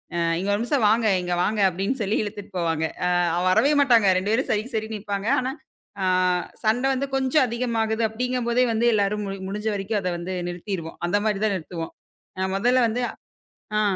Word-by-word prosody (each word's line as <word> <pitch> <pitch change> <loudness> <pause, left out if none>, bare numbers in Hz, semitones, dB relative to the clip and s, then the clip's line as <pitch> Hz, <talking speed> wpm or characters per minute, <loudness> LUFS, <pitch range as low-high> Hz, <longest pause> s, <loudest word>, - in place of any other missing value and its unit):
அ - - -1 0.2
"இங்க 195 +2 -2
ஒரு 205 - 0
நிமிஷம் 245 -1 +1
வாங்க, 225 0 +3 0.2
இங்க 175 0 -1
வாங்க" 210 +2 0
அப்படின்னு 195 +8 -2
சொல்லி 205 +2 0
இழுத்துட்டு 205 -1 -7
போவாங்க. 160 -2 0 0.2
அ - - +2 0.3
வ 180 - 0
வரவே 275 +10 +4
மாட்டாங்க, 230 -7 +5
ரெண்டு 200 +3 -2
பேரும் 260 +4 0
சரிக்கு 220 +4 -2
சரின்னு 220 0 -2
நிப்பாங்க. 200 +1 -3
ஆனா, 260 +1 -2 0.5
அ - - +2 0.6
சண்டை 245 +5 +2
வந்து 275 +2 -2
கொஞ்சம் 265 +1 +3
அதிகமாகுது 230 -2 0
அப்படிங்கும் 250 +1 -2
போதே 250 +2 +3
வந்து 235 +2 +2
எல்லாரும் 205 +1 0
முடி 195 0 -4
முடிஞ்ச 210 +2 -4
வரைக்கும் 200 +1 -2
அதை 180 - -1
வந்து 185 +2 -4
நிறுத்திருவோம், 175 -2 -5
அந்த 205 +4 +2
மாதிரிதான் 210 -1 +1
நிறுத்துவோம். 165 -1 -7 0.5
அ 190 - 0
முதல்ல 245 +4 +3
வந்து 245 +3 -2 0.8
ஆ. - - +3
215 Hz, 185 wpm, -24 LUFS, 195-235 Hz, 0.8 s, மாட்டாங்க